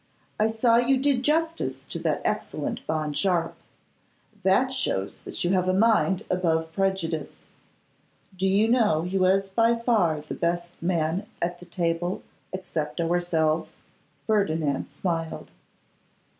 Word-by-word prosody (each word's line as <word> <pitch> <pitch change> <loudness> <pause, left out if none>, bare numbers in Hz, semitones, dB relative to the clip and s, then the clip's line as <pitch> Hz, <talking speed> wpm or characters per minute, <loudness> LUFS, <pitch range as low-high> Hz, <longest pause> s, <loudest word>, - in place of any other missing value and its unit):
I 215 - +4
saw 230 +1 +3
you 250 +3 +3
did 270 -1 +2
justice 325 +4 0
to - - -5
that - - -1
excellent - - -2
Bond 155 -2 -1
Sharpe. 175 -3 +1 0.9
That 195 +8 +3
shows 100 - -1
that - - -4
you 175 - +1
have 185 -1 +2
a 185 - +2
mind 210 -3 +3
above 160 -3 0
prejudice. 170 -5 -2 0.9
Do 190 +1 0
you 200 +3 +3
know 225 -10 +3
he 185 +2 -1
was 195 +1 +3
by 230 +4 +3
far 210 -10 +1
the 150 - -7
best 175 0 -2
man 170 +3 0
at 175 +1 -2
the 180 - -13
table 175 +1 -1 0.3
except 165 -4 -4
ourselves?' 165 -2 0 0.5
Ferdinand 160 - 0
smiled. 165 -3 -3
185 Hz, 130 wpm, -26 LUFS, 165-215 Hz, 0.9 s, I